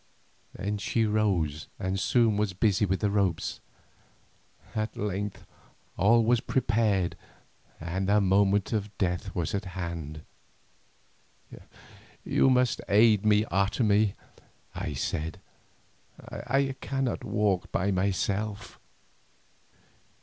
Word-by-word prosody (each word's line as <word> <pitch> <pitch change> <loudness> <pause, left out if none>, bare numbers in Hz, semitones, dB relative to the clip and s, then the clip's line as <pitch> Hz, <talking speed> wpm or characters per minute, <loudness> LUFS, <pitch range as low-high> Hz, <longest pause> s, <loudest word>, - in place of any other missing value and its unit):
Then 105 +1 -3
she 115 +2 0
rose 95 -9 0
and 95 0 -2
soon 115 +1 +3
was 105 -2 0
busy 100 +2 +2
with 95 +1 -1
the 105 -2 +1
ropes. 100 -5 0 1.1
At 110 0 -3
length 100 0 -3 0.5
all 115 +5 +4
was 120 +1 +3
prepared 105 -7 +1 0.6
and 95 +4 -3
the 105 +1 +5
moment 100 +1 +2
of 105 -1 -3
death 90 +1 -2
was 85 -3 -2
at 100 0 -2
hand. 80 -4 -5 2.0
"You - - +3
must 125 -2 +2
aid 105 0 +5
me, 105 0 +4
Otomie," 100 +2 +2 0.6
I - - -4
said; 80 +1 -3 0.8
"I 135 +2 -1
cannot 135 -3 -2
walk 105 -2 0
by 100 +3 0
myself." 100 +1 -2
100 Hz, 105 wpm, -28 LUFS, 95-110 Hz, 2.0 s, the